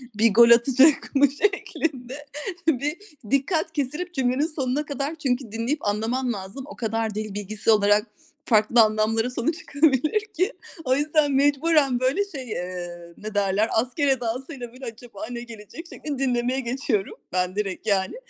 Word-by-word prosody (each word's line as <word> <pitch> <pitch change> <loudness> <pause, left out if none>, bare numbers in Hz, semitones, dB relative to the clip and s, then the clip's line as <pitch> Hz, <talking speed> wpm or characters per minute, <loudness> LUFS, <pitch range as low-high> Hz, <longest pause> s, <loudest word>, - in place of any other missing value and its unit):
bir 220 0 +3
gol 235 +2 +7
atacak 265 +6 +5
mı 280 +1 +6
şeklinde 290 -7 -2 0.4
bir 295 +2 +1 0.3
dikkat 315 +4 +1
kesilip 300 +6 -3
cümlenin 265 +2 +1
sonuna 290 -2 -2
kadar 285 +2 -3
çünkü 255 -6 -2
dinleyip 230 +3 -2
anlaman 235 +4 0
lazım. 195 +6 -7
O - - -10
kadar 225 -2 -2
dil 215 -1 -4
bilgisi 210 +2 -1
olarak 210 +1 +4 0.4
farklı 220 +1 +5
anlamlara 220 +2 +2
sonu 250 +5 -1
çıkabilir 310 - +1
ki. 375 +8 0 0.3
O 255 0 +3
yüzden 295 0 +2
mecburen 285 -1 +3
böyle 265 +11 +1
şey, 275 - -8
eee, 175 -2 -6
ne 215 0 -7
derler, 205 +1 +1
asker 250 +6 +1
edasıyla 255 0 -2
böyle 260 +1 -10
acaba 230 -2 -8
ne 235 - -5
gelecek 230 - -10
şeklinde 290 -5 -6
dinlemeye 250 +1 0
geçiyorum 240 -5 -2 0.2
ben 180 0 0
direkt, 205 0 -3
yani. 195 - +1
250 Hz, 150 wpm, -24 LUFS, 215-285 Hz, 0.4 s, gol